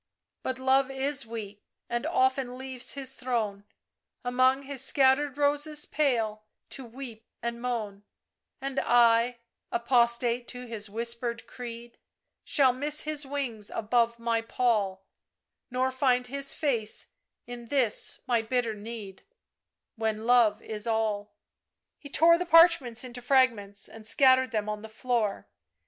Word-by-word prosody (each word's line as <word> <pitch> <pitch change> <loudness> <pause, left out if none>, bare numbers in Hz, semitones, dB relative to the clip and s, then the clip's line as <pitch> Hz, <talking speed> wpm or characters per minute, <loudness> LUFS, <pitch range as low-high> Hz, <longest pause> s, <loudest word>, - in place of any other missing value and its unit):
" - - -60
But 260 - -3
Love 265 +1 +2
is 270 -1 -1
weak, 210 -3 -7 0.3
And 240 0 -2
often 260 -1 +1
leaves 260 -1 -4
his 265 -1 -4
throne, 220 -6 -2 0.6
Among 255 +2 +3
his 270 -1 -2
scattered 275 +1 +3
roses 295 +1 +1
pale 230 -8 0 0.3
To 270 - -6
weep 235 -2 -9 0.2
and 235 0 -3
moan, 220 -5 -3 0.6
And 275 0 -2
I, 235 0 +4 0.3
apostate 235 0 +2
to 250 0 -7
his 220 -3 -5
whispered 235 +2 -3
creed, 235 -1 -9 0.4
Shall 265 -3 +3
miss 295 +4 0
his 300 -2 -2
wings 250 -7 -4
above 235 +1 +1
my 230 -1 0
pall, 210 -5 0 0.6
Nor 255 +1 0
find 255 -1 +2
his 275 +2 -3
face 235 -9 -1 0.4
in 240 -1 -9
this 250 -5 +2
my 235 -2 +2
bitter 230 0 -1
need, 210 -2 -8 0.8
When 220 0 -2
Love 235 -3 +4
is 215 +1 -4
all 215 -2 -1 0.3
!" - - -57
He 285 - -11
tore 335 +4 +5
the 360 - -3
parchments 330 -9 +5
into 245 -1 -8
fragments 235 -6 +1
and 225 - -12
scattered 260 +1 +4
them 215 -3 -2
on 210 0 -4
the 220 - -9
floor. 220 -2 -1
245 Hz, 135 wpm, -28 LUFS, 225-265 Hz, 0.8 s, tore